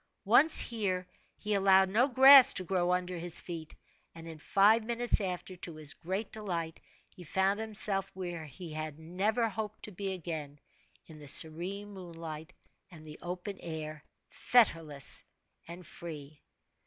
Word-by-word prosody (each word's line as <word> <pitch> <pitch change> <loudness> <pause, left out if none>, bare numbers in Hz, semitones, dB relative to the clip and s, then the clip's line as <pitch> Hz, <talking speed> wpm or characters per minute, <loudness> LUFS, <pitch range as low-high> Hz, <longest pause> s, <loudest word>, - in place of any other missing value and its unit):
Once 275 +10 +6
here 190 -6 -1 0.3
he 210 0 -3
allowed 190 -1 +4
no 225 +7 +2
grass 270 0 +9
to 185 - -1
grow 180 0 -1
under 180 -1 -2
his 175 0 +4
feet; 165 -3 -8 0.4
and, 165 0 -10
in 160 -1 -10
five 205 +7 +3
minutes 235 0 -1
after, 185 -1 -5
to 170 -2 -8
his 155 -1 -5
great 190 +5 -5
delight, 170 -7 -5 0.3
he 180 - -15
found 190 +5 0
himself 205 -3 -1
where 175 -3 -6
he 155 +4 -10
had 155 -1 -6
never 195 +8 -1
hoped 215 0 -6
to 210 - -7
be 195 +1 -5
again 155 -5 -7 0.5
in 155 -2 -13
the 145 - -12
serene 180 +8 0
moonlight 165 -3 -9 0.4
and 160 -3 -14
the 150 - -11
open 180 +3 -6
air, 155 -2 -7 0.3
fetterless 165 - +1 0.5
and 170 +1 -10
free. 150 -4 -10
180 Hz, 150 wpm, -30 LUFS, 160-205 Hz, 0.5 s, grass